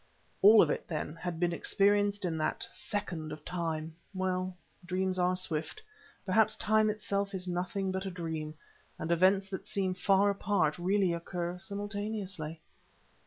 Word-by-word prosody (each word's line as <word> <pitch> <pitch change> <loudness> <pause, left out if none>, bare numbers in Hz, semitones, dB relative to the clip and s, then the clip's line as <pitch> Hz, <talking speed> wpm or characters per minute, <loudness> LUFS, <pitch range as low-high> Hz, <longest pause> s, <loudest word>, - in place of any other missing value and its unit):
All 210 +2 +9
of - - +1
it, - - -3
then, 155 -1 -3
had 170 0 -4
been 175 -1 +1
experienced 205 +2 +2
in 170 -2 -1
that 155 - 0
second 170 -7 -3
of 150 0 -8
time. 165 -3 -3 0.2
Well, 185 -1 -1 0.3
dreams 185 +1 -1
are 180 +1 +3
swift; 180 - -1 0.5
perhaps 220 +3 +3
Time 215 0 +3
itself 200 -1 -1
is 185 -1 -5
nothing 185 +2 -1
but 190 +1 -3
a - - -1
dream, 160 -4 -4 0.4
and 165 - -3
events 190 +3 +4
that 190 - -5
seem 190 -2 0
far 195 +2 +3
apart 195 -6 +1
really 190 0 +2
occur 175 +1 -4
simultaneously. 200 -4 -4
185 Hz, 150 wpm, -31 LUFS, 170-200 Hz, 0.5 s, All